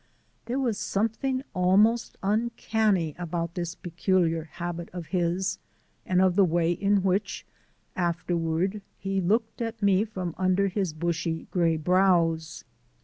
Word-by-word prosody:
There 245 +2 -1
was 245 -6 0
something 240 +6 -1
almost 205 +6 +3
uncanny 215 -5 +1
about 170 -1 -3
this 175 -1 -4
peculiar 170 -2 0
habit 170 +1 -6
of 175 -3 -7
his 180 +1 0 0.5
and 185 -1 +2
of 185 -2 +3
the 200 - +6
way 170 -1 +2
in 200 +2 +1
which, 195 +2 -1 0.5
afterward, 175 +2 -1 0.2
he 195 -1 -1
looked 220 +6 0
at 230 0 -3
me 200 0 +4
from 185 -6 -5
under 185 +1 +2
his 190 -2 -1
bushy 165 +1 -2
gray 170 -3 +2
brows. 165 -2 +2
185 Hz, 130 wpm, -27 LUFS, 170-200 Hz, 0.5 s, the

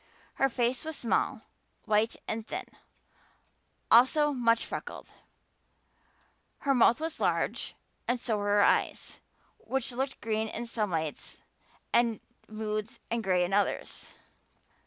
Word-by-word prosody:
Her 270 - +5
face 245 +2 0
was 320 0 -4
small, 235 - 0 0.4
white 215 +1 +2
and 220 0 -3
thin, - - -4 1.3
also 295 +5 +6
much 230 -3 +2
freckled; - - -7 1.5
her 275 - +2
mouth 240 0 +5
was 320 0 -3
large - - 0 0.3
and 245 +1 +1
so 230 -2 0
were 205 - -2
her 205 0 +4
eyes, - - +1 0.4
which 265 -1 -2
looked 265 +2 -3
green 220 0 -1
in 230 +2 -4
some 220 -3 -1
lights 160 -3 -3 0.6
and 235 -2 +3 0.3
moods 215 0 -4
and 230 -1 0
gray 185 -2 +3
in 185 - -4
others. 205 0 -1
230 Hz, 125 wpm, -30 LUFS, 215-255 Hz, 1.5 s, also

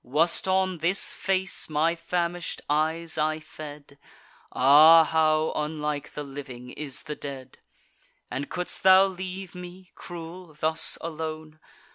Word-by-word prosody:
Was't 160 +9 +1
on 185 -2 +1
this 175 +5 +2
face 190 -2 -1
my 155 +2 +1
famish'd 170 0 -3
eyes 160 +2 -1
I 155 +1 0
fed? 150 -2 -11 0.5
Ah! 155 +5 +7
how 155 0 +1
unlike 150 -1 -3
the 150 - -5
living 130 -3 -9
is 145 -3 -6
the 150 -1 -6
dead! 135 -3 -9 0.7
And 140 - -4
could'st 180 0 -4
thou 190 0 +7
leave 185 0 -6
me, 180 0 -11
cruel, 170 -1 -10
thus 160 +1 +2
alone? 155 -1 -6
160 Hz, 125 wpm, -26 LUFS, 150-175 Hz, 0.7 s, Ah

